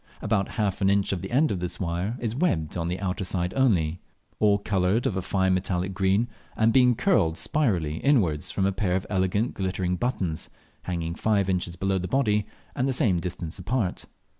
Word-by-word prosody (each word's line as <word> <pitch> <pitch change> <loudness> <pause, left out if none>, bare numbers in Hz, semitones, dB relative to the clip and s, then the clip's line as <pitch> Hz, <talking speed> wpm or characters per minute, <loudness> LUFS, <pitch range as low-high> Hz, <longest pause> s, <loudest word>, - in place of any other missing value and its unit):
About 100 -2 0
half 105 -3 0
an 95 - +4
inch 100 0 +2
of 90 - -3
the 95 - -6
end 145 +5 +3
of 95 - -1
this 90 0 -4
wire 90 +6 -2
is 115 -1 -3
webbed 90 - 0
on 85 -2 -2
the 90 +2 -2
outer 95 0 -2
side 90 -1 -1
only, 90 -11 +2 0.4
awe 105 -1 +4
coloured 100 +2 0
of 95 - 0
a 95 - -1
fine 95 0 +1
metallic 90 0 -1
green, 95 +4 +2 0.3
and 110 +1 +3
being 125 -2 +5
curled 85 - +2
spirally 85 - 0
inwards 95 - +2
form 95 - 0
a 100 - +2
pair 95 -2 0
of 95 - -1
elegant 100 +4 +1
glittering 95 -2 -1
buttons, 90 -7 -2 0.4
hanging 85 -2 -2
five 100 +1 +1
inches 90 -2 -1
below 95 +1 0
the 90 - -3
body, 105 -5 +1 0.3
and 130 -1 0
the 135 - +1
same 100 -8 +2
distance 85 0 -6
apart. 105 0 -2
95 Hz, 195 wpm, -26 LUFS, 90-110 Hz, 0.4 s, being